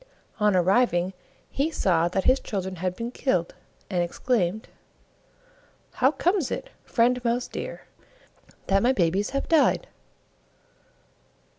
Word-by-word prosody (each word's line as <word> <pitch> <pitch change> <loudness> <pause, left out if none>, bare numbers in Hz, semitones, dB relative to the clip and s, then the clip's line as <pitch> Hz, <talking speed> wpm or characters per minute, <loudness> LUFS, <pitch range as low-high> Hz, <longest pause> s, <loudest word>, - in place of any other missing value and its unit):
Oh 210 - +3
arriving 185 -1 +2 0.4
he 285 +4 0
saw 170 - +1
that 185 +2 -1
his 260 +1 +4
children 190 -2 -4
had 180 +1 -2
been 230 +3 -5
killed, 180 -11 -1 0.3
and 180 -3 0
exclaimed, 195 +2 -1 1.2
"How 260 - +3
comes 350 0 0
it, - - -5
Friend 245 +1 +1
Mouse 240 +1 0
deer, - - -6 0.8
that 195 0 +2
my 250 +4 +3
babies 190 0 +1
have 275 0 -3
died?" 325 +9 +3
210 Hz, 120 wpm, -25 LUFS, 180-255 Hz, 1.2 s, his